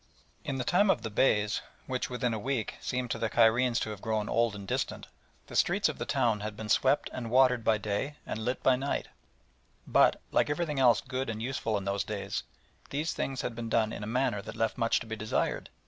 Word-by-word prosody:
In 140 - -3
the 125 - -1
time 185 +10 +3
of 120 - +2
the 110 - -4
Beys, 105 -2 +2 0.2
which 130 -1 -2
within 125 -1 -1
a 110 - -2
week 125 -1 -2
seemed 125 -1 -2
to - - -2
the 115 - 0
Cairenes 120 +2 +4
to 110 - -2
have 105 -2 -8
grown 110 -2 -1
old 115 -2 +2
and 100 -1 -8
distant, - - -2 0.4
the - - -10
streets - - +3
of - - -6
the - - -3
town 110 -3 +2
had 105 0 -5
been 110 -1 -6
swept 135 +5 +3
and 120 -3 -4
watered 125 -1 +4
by 110 -1 +3
day 105 +8 -2
and 110 - -4
lit 125 +3 -2
by 130 - +5
night, 135 +3 -2 0.8
but, - - +4
like - - +2
everything 150 -2 -1
else 125 -3 +5
good 130 -1 -3
and 110 0 -4
useful 115 -4 -1
in 100 - -5
those 100 -1 0
days, - - -3 0.5
these 150 +3 -1
things 135 -1 -2
had 120 - -2
been 115 0 -5
done 110 0 +2
in - - -6
a - - -4
manner 115 -3 0
that - - -8
left 115 -1 0
much 115 -2 +2
to - - -6
be 110 0 -4
desired. 110 0 -1
115 Hz, 225 wpm, -30 LUFS, 110-130 Hz, 0.8 s, by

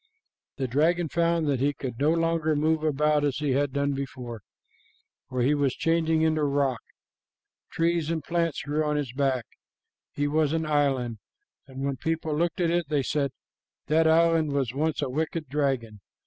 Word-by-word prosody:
"The 135 -2 -1
dragon 160 +6 +1
found 170 0 +1
that 140 -3 +1
he 145 +2 +1
could 130 -4 -6
no 145 +2 +3
longer 165 -2 +1
move 155 +1 +1
about 150 0 +2
as 145 -3 0
he 150 -2 -1
had 140 +1 +1
done, 140 +1 0
for 120 -4 -8 1.0
he 135 +5 +3
was 140 -3 +1
changing 160 -1 +1
into 155 -1 +2
rock. 140 -4 +1 0.9
Trees 165 -1 0
and 165 -3 -2
plants 170 -2 -1
grew 150 +2 0
on 150 0 0
his 140 -5 -2
back. 130 -3 0 0.7
He 145 0 -1
was 155 0 +1
an 160 -1 0
island, 135 -6 0 0.5
and 135 0 -5
when 140 -1 -2
people 160 +2 -2
looked 170 +2 0
at 170 -2 +2
it, 170 -3 0
they 145 -3 +1
said, 140 0 0 0.6
'That 160 +1 +3
island 165 -2 +3
was 135 -4 0
once 150 +1 -1
a 140 - -2
wicked 155 +2 -2
dragon.' 130 -7 -1
150 Hz, 170 wpm, -26 LUFS, 135-160 Hz, 1.0 s, no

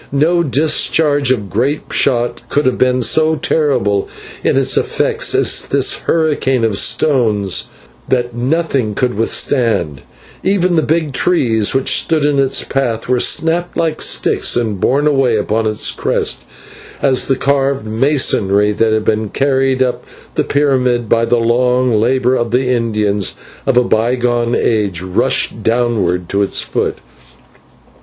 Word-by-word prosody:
No 160 +5 +2
discharge 150 -1 +1
of 115 -6 -1
grape 130 +10 -2
shot 120 -3 0
could 145 - 0
have 130 - 0
been 125 -1 +2
so 155 +7 +3
terrible 135 -10 0 0.3
in - - +1
its - - +2
effects - - 0
as - - +3
this - - +1
hurricane 145 -6 0
of 110 -3 0
stones 110 - +1 0.4
that 120 -2 -1
nothing 130 -4 -1
could 125 -2 0
withstand, 115 - 0 0.4
for - - -5
even 185 -2 +1
the 160 - +3
big 155 -2 -1
trees 120 - +1
which 135 - +2
stood 155 -3 -1
in 145 -1 +1
its 135 -1 +1
path 120 -5 -2
were 125 0 +1
snapped 170 +6 0
like 160 -2 -1
sticks - - +1
and 110 -5 -2
borne 140 +3 +1
away 135 -5 +2
upon 110 +1 -1
its 110 -1 0
crest, - - -2 0.6
as 130 -2 +2
the 135 - +1
carved 135 -1 0
masonry 110 -4 +1
that 110 +2 0
had 110 0 -1
been 110 -1 -1
carried 135 0 +1
up 125 -1 -3 0.3
the - - 0
pyramid 125 -5 0
by 115 0 +2
the 120 +1 +1
long 125 +2 +1
labour 125 +3 +1
of 120 -2 -1
the 125 +2 0
Indians 105 -5 0 0.3
of 135 -2 +2
a 125 - +5
bygone 120 +1 0
age, 100 -6 -1
rushed 95 -1 0
downward 110 -7 0
to 100 +2 -1
its 100 - 0
foot. - - -2
125 Hz, 150 wpm, -15 LUFS, 110-140 Hz, 0.6 s, a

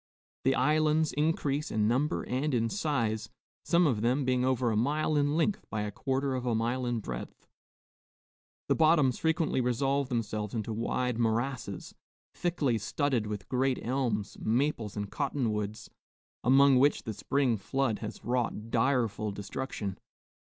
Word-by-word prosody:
The 135 0 +4
islands 155 +3 +2
increase 150 -1 0
in 105 -1 +1
number 135 +8 +1
and 135 +2 -1
in 115 -1 +1
size, 115 - -1 0.3
some 175 +1 +3
of 120 -9 +1
them 125 +4 +1
being 125 -1 +2
over 130 -2 +1
a - - 0
mile 150 +7 +1
in 145 +1 +2
length 180 +5 +1
by 110 -1 -2
a 105 - -3
quarter 135 +4 -1
of 130 -1 -2
a 120 -2 0
mile 120 +3 -1
in 120 -2 -1
breadth; 60 -9 -7 1.2
the - - +4
bottoms 155 -6 +3
frequently 160 -4 +1
resolve 135 +2 0
themselves 110 -3 -2
into 110 0 -2
wide 120 +2 -1
morasses, 115 -2 -2 0.4
thickly 150 -10 0
studded 125 0 0
with 105 -2 -5
great 130 0 +1
elms, 115 -5 -1
maples, 115 -3 0
and 105 -1 -4
cotton 135 -5 -1
woods, 105 +1 -4 0.6
among 135 +1 +6
which 145 +3 +3
the 110 - -4
spring 130 +2 +1
flood 110 +3 -1
has 110 - -7
wrought 115 -2 -1
direful 115 -4 +1
destruction. 100 0 -5
125 Hz, 150 wpm, -30 LUFS, 110-140 Hz, 1.2 s, among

